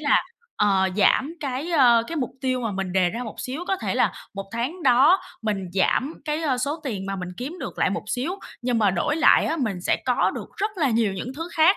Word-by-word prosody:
là, 290 -2 +3 0.3
ờ, 195 -2 +3
giảm 265 +10 +3
cái, 280 +4 -3
a, 245 -7 +5
cái 330 - -5
mục 255 -4 -1
tiêu 255 -1 0
mà 225 -3 -2
mình 190 -2 -3
đề 185 -2 +3
ra 235 +3 -4
một 220 - -7
xíu. 275 +7 -4
Có 385 - +2
thể - - -3
là - - +2 0.2
1 195 0 -5
tháng 260 +10 -3
đó 285 +10 +5 0.2
mình 200 -4 -2
giảm 260 +10 +1
cái, 305 +1 -2
a, 265 -5 +1
số 290 +5 -2
tiền 200 -7 -3
mà 195 0 -3
mình 180 -1 -5
kiếm 280 +9 -5
được - - -6
lại - - +2
một - - -2
xíu, 275 +9 -1 0.3
nhưng 245 -1 +1
mà 210 -3 +4
đổi 190 - 0
lại - - +5
á, 325 - 0
mình 215 - -2
sẽ - - +1
có - - +2
được - - -7
rất 415 +2 -1
là 295 -7 +2
nhiều 225 -3 +2
những 235 +8 -5
thứ 330 +2 -5
khác. 330 +4 +5
250 Hz, 245 wpm, -24 LUFS, 205-310 Hz, 0.3 s, a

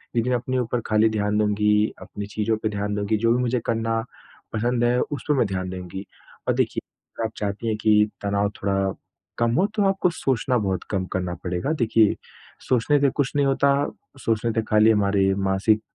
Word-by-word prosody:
लेकिन 120 +2 +1
अपने 125 +1 -1
ऊपर 120 0 -1
खाली 110 +1 +4
ध्यान 105 -1 0
दूँगी, 105 0 +2
अपनी 100 - -7
चीज़ों 110 +1 -1
पे 110 - +1
ध्यान 105 0 -2
दूँगी, 105 +1 0
जो 115 +2 +2
भी 125 - +1
मुझे 125 0 +1
करना 115 0 0 0.5
पसंद 120 +2 0
है 120 +1 +3
उस 145 -4 -4
पे 150 - +3
मैं 125 - +3
ध्यान 95 -1 -3
देंगी। 95 +1 -7 0.4
और - - +3
देखिए, - - 0 0.4
अगर 115 - -1
आप 110 - -3
चाहती 105 +2 -3
हैं 110 -1 0
कि 105 -1 +5 0.2
तनाव 100 0 0
थोड़ा 95 -1 0 0.4
कम 120 0 +2
हो, 190 - +4
तो 210 0 -1
आपको 195 -2 +1
सोचना 130 -3 0
बहुत 95 -4 -1
कम 95 -3 0
करना 90 -1 -2
पड़ेगा, 90 - -2
देखिए, 115 -6 +3 0.5
सोचने 130 +4 +3
से 140 - +4
कुछ 135 0 -1
नहीं 145 -1 +3
होता, 140 +1 +3 0.5
सोचने 115 +1 +1
से 115 - +1
खाली 110 +1 +5
हमारे 100 -2 +2
मानसिक 100 +3 +1
110 Hz, 190 wpm, -24 LUFS, 100-120 Hz, 0.5 s, कि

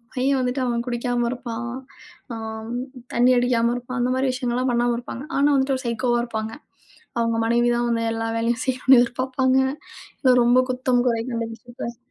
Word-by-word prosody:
பையன் 265 +1 +2
வந்துட்டு 250 +2 -1
அவன் 235 -1 -1
குடிக்காம 240 0 -1
இருப்பான், 240 -1 -5 0.6
ஆ - - -4 0.8
தண்ணி 245 +2 +4
அடிக்காம 240 -1 +2
இருப்பான், 245 +1 -5
அந்த 250 +1 +1
மாரி 265 0 +1
விஷயங்கள்லாம் 250 0 -1
பண்ணாம 240 0 +2
இருப்பாங்க. 250 +3 -7
ஆனா, 280 +1 +4
வந்துட்டு 265 -1 +1
சைக்கோவா 240 +1 +1
இருப்பாங்க. 220 -2 -4 0.7
அவங்க 230 -1 +1
மனைவி 235 +1 +2
தான் 240 - 0
வந்து 230 -1 0
எல்லா 225 0 -2
வேலையும் 230 0 0
செய்யணும்னு 260 0 +4
எதிர்பார்ப்பாங்க. 260 +2 +1 0.6
இல 260 - +5
ரொம்ப 245 +2 +5
குத்தம் 250 -1 +1
குறை 230 -2 +1
கண்டுபிடிச்சு 230 0 -5
பேசறது 235 0 -5
245 Hz, 160 wpm, -23 LUFS, 235-255 Hz, 0.8 s, இல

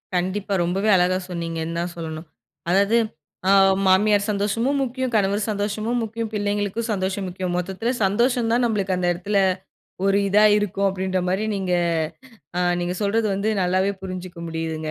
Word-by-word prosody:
கண்டிப்பா. 190 +3 -1
ரொம்பவே 190 +5 0
அழகா 180 0 +3
சொன்னீங்கன்னு 165 -1 -4
தான் 175 +1 -3
சொல்லணும். 160 0 -6 0.4
அதாவது 200 +5 +3 0.5
ஆ - - +6 0.3
மாமியார் 205 +2 +4
சந்தோஷமும் 225 +7 0
முக்கியம். 260 0 -3
கணவர் 200 0 +2
சந்தோஷமும் 215 +3 -1
முக்கியம். 225 0 -4
பிள்ளைங்களுக்கும் 205 +2 -1
சந்தோஷம் 190 0 -2
முக்கியம். 180 0 -3
மொத்தத்தில 190 +6 -2
சந்தோஷம் 235 +4 +2
தான் 240 +2 +2
நம்மளுக்கு 200 -5 0
அந்த 180 -1 0
இடத்தில 200 +4 -2 0.7
ஒரு 195 0 +3
இதா 205 +2 +4
இருக்கும். 200 -1 -1
அப்பிடின்ற 190 0 -1
மாரி 195 +4 0
நீங்க, 190 -2 -1 0.9
அ - - +1 0.2
நீங்க 175 +1 -2
சொல்றது 215 +2 +1
வந்து 200 +3 -1
நல்லாவே 185 +2 +2
புரிஞ்சுக்க 185 -1 -7
முடியுதுங்க. 160 -1 -3
195 Hz, 145 wpm, -23 LUFS, 180-210 Hz, 0.9 s, ஆ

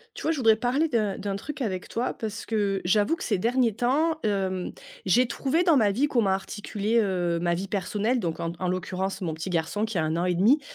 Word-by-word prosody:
Tu - - -7
vois, 320 - +2
je - - -4
voudrais 225 -4 +4
parler 265 +7 +1
d'un 215 -6 0
d'un 200 -1 -3
truc 295 +7 -7
avec 190 -6 -2
toi, 235 +2 -2
parce 220 0 -5
que 205 -3 0
j'avoue 205 - +2
que - - -8
ces 210 - 0
derniers 235 +2 +2
temps, 290 +8 +1
hem, 190 -3 -1 0.3
j'ai 235 +7 +4
trouvé 275 +7 0
dans 335 -5 +5
ma 210 -5 +4
vie 260 +9 +1
comment 230 -8 +2
articuler, 205 +3 -1
heu, 175 -4 0
ma 175 0 +1
vie 190 +3 -5
personnelle, 210 +5 0
donc 170 -6 -3
en 165 - -1
d 170 - -7
en 185 - -1
l'occurrence, 185 +2 -2
mon 165 -4 -2
petit 160 +4 -5
garçon 175 +5 0
qui 220 -3 -4
a 160 - +2
1 155 +1 -1
an 175 - 0
et 180 -1 +1
1/2, 220 - +5
205 Hz, 240 wpm, -26 LUFS, 185-240 Hz, 0.3 s, dans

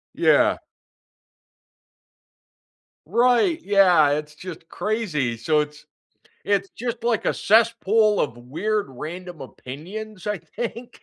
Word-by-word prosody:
Yeah. - - +4 2.5
Right, 250 +8 +3
yeah, 180 -7 +5
it's 150 +1 -3
just 165 -1 -10
crazy, 175 - -1
so 150 +7 +1
it's 150 0 -4 0.6
it's 195 -1 0
just 235 -1 -5
like 235 -2 0
a - - +2
cesspool 220 -1 +3
of 120 - -1
weird, 200 - -2
random 165 +4 -8
opinions, 180 - -9
I 210 -3 -1
think? 235 +8 -7
195 Hz, 105 wpm, -23 LUFS, 150-220 Hz, 2.5 s, yeah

